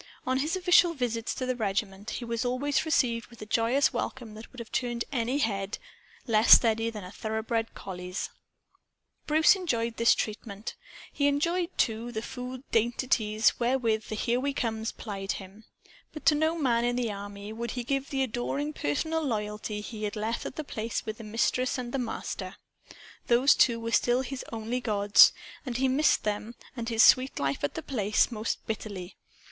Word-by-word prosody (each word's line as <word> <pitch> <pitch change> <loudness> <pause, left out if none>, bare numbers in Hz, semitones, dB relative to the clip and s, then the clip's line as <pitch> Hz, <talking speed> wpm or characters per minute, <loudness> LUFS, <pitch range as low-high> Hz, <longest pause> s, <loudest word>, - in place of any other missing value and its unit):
On 260 +1 +1
his 305 +5 0
official 360 -2 +4
visits 235 -4 -2
to 255 - -3
the 255 0 -1
regiment, 205 -1 -2
he 240 - -4
was 230 0 -2
always 260 +5 0
received 235 -7 +1
with 235 - -16
a - - -7
joyous 230 +6 +2
welcome 240 -5 -4
that 220 +1 -11
would 255 - -16
have 235 -2 -8
turned 240 -2 -1
any 250 0 0
head 200 -6 -1 0.5
less 220 -1 +6
steady 225 -1 +5
than 215 -3 -7
a 180 - -9
thoroughbred 220 +1 -2
collie's. 180 0 -5 1.0
Bruce 315 +5 +5
enjoyed 235 -11 -1
this 230 - +5
treatment. 210 -1 -5 0.4
He 285 - +2
enjoyed, 335 +5 +1
too, 230 +1 0
the 220 -1 -4
food 250 +1 -7
dainties 225 -2 +2
wherewith 235 -3 +1
the 215 - -3
"Here 240 +3 0
We 280 +1 -2
Comes" 220 -2 -2
plied 195 -3 -4
him. 195 +3 -10 0.5
But 305 - -9
to - - +6
no 315 +2 +1
man 240 -6 +2
in 240 0 +1
the 240 -3 -1
army 200 +1 -7
would 235 +1 -4
he 245 - -1
give 275 +2 -2
the 270 -1 0
adoring 265 +5 -2
personal 315 - -1
loyalty 210 -5 -3
he 215 0 -5
had 205 - -3
left 220 +2 -2
at - - -8
The 310 - -4
Place 225 -5 -4
with 220 0 -5
the - - -8
Mistress 235 +4 0
and 245 -1 -5
the 270 - 0
Master. 215 -5 -4 0.7
Those 245 +4 +5
two 235 -2 +3
were 230 0 -4
still 245 +2 +3
his 265 0 -5
only 225 +2 -3
gods. 205 -3 +6 0.3
And 250 -4 -3
he 265 +1 +2
missed 275 +4 +3
them 210 +2 -3 0.2
and 235 -2 -4
his 225 0 +4
sweet 260 +1 +5
life 140 0 -1
at 145 - -1
The - - -4
Place 215 -3 +1
most 220 -1 -3
bitterly. 200 -4 -5
230 Hz, 185 wpm, -28 LUFS, 215-260 Hz, 1.0 s, less